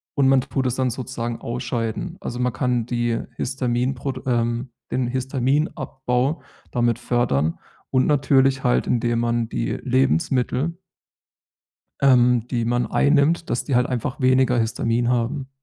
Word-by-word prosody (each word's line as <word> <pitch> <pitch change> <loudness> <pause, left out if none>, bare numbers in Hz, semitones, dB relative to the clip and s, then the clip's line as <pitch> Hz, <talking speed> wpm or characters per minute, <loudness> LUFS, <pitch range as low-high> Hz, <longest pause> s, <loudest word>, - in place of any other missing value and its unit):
und 140 -2 +3
man 135 -1 +5
tut 130 +1 -2
es 125 - -1
dann 130 -1 +1
sozusagen 120 -1 -4
ausscheiden. 120 +7 -3
Also, 120 - -5
man 125 -1 0
kann 125 -3 0
die 120 -1 -1 0.2
Histaminprod 130 +1 -2
ähm, 120 0 0 0.2
den 130 -1 0
Histaminabbau 130 +1 -1 0.3
damit 120 -1 +1
fördern. 120 - 0 0.3
Und 130 -1 +3
natürlich 135 -2 +3
halt, 125 - +2
indem 120 -1 +1
man 120 -1 0
die - - -2
Lebensmittel 135 +3 +1 1.2
ähm, 125 -3 +4
die 120 -3 -1
man 120 +1 0
einnimmt 150 +4 +2
dass 120 - -1
die 135 - 0
halt 125 0 +3
einfach 125 +1 -3
weniger 130 -1 +3
Histamin 115 +1 0
haben. 125 +2 -1
125 Hz, 135 wpm, -22 LUFS, 120-135 Hz, 1.2 s, man